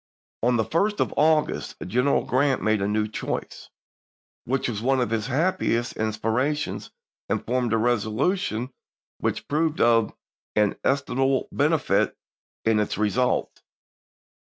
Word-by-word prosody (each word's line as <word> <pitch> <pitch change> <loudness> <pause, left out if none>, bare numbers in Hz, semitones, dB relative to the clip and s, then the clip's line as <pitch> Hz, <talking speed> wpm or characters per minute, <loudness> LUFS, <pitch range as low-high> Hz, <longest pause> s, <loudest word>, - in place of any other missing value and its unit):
On 120 +1 +3
the 110 - +1
1st 200 - 0
of - - 0
August 155 0 +2
General 125 +8 +1
Grant 130 +1 +1
made 110 -2 +2
a 100 - +1
new 105 +1 0
choice, 110 - -5 0.8
which 135 +2 0
was 110 -4 -3
one 130 +2 +2
of 120 -3 0
his 110 -1 -1
happiest 135 -5 0
in 110 0 -1
spirations, 125 +8 -1 0.4
and - - -1
formed 125 -1 0
a 115 - +3
resolution 120 - 0 0.5
which - - -2
proved 155 +1 0
of 115 -2 +4 0.4
inestimable 135 +5 +1
benefit - - +1 0.5
in 110 -1 +3
its 105 - -1
results. 110 +4 0
120 Hz, 130 wpm, -25 LUFS, 110-140 Hz, 0.8 s, of